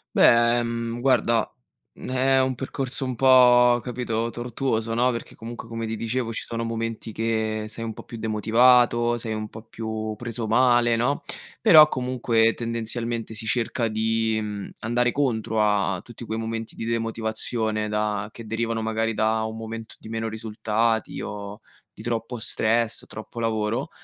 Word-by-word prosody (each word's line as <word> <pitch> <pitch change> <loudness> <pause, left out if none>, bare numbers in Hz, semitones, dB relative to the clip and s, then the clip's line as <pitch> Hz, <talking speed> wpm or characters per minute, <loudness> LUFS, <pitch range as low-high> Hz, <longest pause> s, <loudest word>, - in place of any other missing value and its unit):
Beh, 120 +1 +5
mhmm, 115 0 -3
guarda, 120 -3 +2 0.4
mhmm - - -10
è 130 +1 +3
un 130 -1 -1
percorso 135 0 -3
un 130 -1 -2
po', 125 -1 +6
capito, 115 -1 -2
tortuoso, 115 -1 -2
no, 125 +2 +3
perché 115 - -7
comunque 115 +1 -8
come 115 0 -4
ti 110 - -3
dicevo 115 +1 -2
ci - - -3
sono 115 0 -3
momenti 115 -1 -4
che 110 -1 -1
sei 115 +1 -6
un 110 - -3
po' - - -10
più 115 -1 -9
demotivato, 120 +2 +4
sei 110 -1 -4
un 110 0 -4
po' 110 - -10
più 110 -1 -5
preso 115 -2 -4
male, 120 0 +4
no, 125 +5 0 0.4
però 160 -9 +9
comunque, 125 -4 +1
tendenzialmente, 115 -1 -3
si 110 +1 -4
cerca 115 0 0
di, 110 0 0
mhmm, 105 -1 -5
andare 120 +2 +1
contro 110 -6 0
a 100 -3 +1
tutti 120 0 -11
quei 110 0 -4
momenti 115 0 -4
di - - -6
demotivazione 110 -1 -1
da 105 -1 -1
che 115 - -10
derivano 115 0 -2
magari 110 0 -1
da 110 +1 +1
un 110 0 -5
momento 115 0 -7
di - - -11
meno 115 0 -3
risultati 110 +1 -1
o 105 0 -7 0.3
di - - -11
troppo 115 +1 -3
stress, 115 +1 0
troppo 110 +2 -9
lavoro. 110 -1 -1
115 Hz, 160 wpm, -24 LUFS, 110-120 Hz, 0.4 s, però